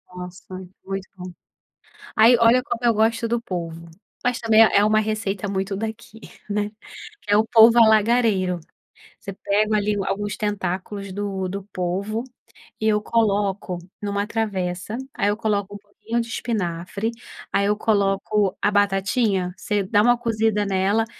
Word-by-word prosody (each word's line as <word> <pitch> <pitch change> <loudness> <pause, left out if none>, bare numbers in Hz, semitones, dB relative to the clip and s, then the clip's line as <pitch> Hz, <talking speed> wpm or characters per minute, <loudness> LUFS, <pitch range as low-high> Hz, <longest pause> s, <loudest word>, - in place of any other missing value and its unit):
Nossa 180 0 -9 0.4
muito 195 0 -5
bom. 180 0 -8 0.9
Aí 230 +3 +7
olha 235 +2 +5
como 240 -3 -4
eu 235 - +5
gosto 225 +2 +1
do 235 +1 0
polvo, 170 -6 -6 0.3
mas 245 -1 0
também 225 -1 +5
é 210 -2 +5
uma 215 +1 +3
receita 210 -2 -2
muito 195 0 -2
daqui, 220 +1 -7 0.3
né, 205 0 -1 0.6
é 205 - +4
o 220 - +3
polvo 230 +1 +6
alagareiro, 215 -4 +3 0.6
Você 200 - -7
pega 210 +2 +1
ali 210 0 0
alguns 205 0 -2
tentáculos 200 -1 -3
do 195 -1 -3
do 195 +1 -5
polvo 195 +5 -2 0.6
e 220 - +1
eu 210 -1 +2
coloco 205 -5 0 0.2
em 205 - -4
uma 200 0 -1
travessa, 200 -2 -3 0.2
aí 200 - 0
eu 205 - -1
coloco 205 -2 -1
um - - -5
pouquinho 210 +3 -5
de 230 - -6
espinafre, 200 -2 -3 0.4
aí 200 0 +2
eu 210 0 +1
coloco 200 -1 +1
a 205 - +2
batatinha, 195 -1 +1
você 205 -2 -1
dá 205 +2 +2
uma 240 +2 +4
cozida 220 -3 0
nela 200 +3 +1
205 Hz, 150 wpm, -22 LUFS, 195-220 Hz, 0.9 s, Aí